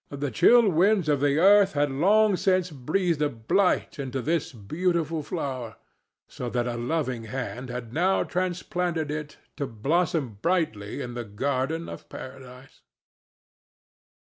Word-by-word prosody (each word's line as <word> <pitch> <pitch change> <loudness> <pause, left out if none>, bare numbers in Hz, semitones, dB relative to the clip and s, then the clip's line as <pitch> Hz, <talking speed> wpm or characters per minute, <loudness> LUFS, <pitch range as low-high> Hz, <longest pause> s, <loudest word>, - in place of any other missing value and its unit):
The 140 -1 -4
chill 235 - +6
winds 190 +1 +3
of 145 -2 +2
the 145 +1 +2
earth 200 +3 +6
had 145 -1 +1
long 200 +8 +4
since 185 -1 +1
breathed 155 +4 -1
a 150 - +2
blight 145 - 0
into 135 -1 -3
this 160 +5 -1
beautiful 160 - -1
flower; 130 -8 -4 0.5
so 125 - -6
that 120 0 -1
a 120 -1 -2
loving 125 -2 -2
hand 125 +1 -5
had 120 -2 -6
now 185 +5 +2
transplanted 175 -3 -2
it 150 -1 -5 0.2
to 140 - -2
blossom 135 - -1
brightly 140 - -1
in 120 - -6
the 120 0 -4
garden 135 +9 -2
of - - -9
Paradise. 130 0 -11
145 Hz, 140 wpm, -26 LUFS, 125-175 Hz, 0.5 s, chill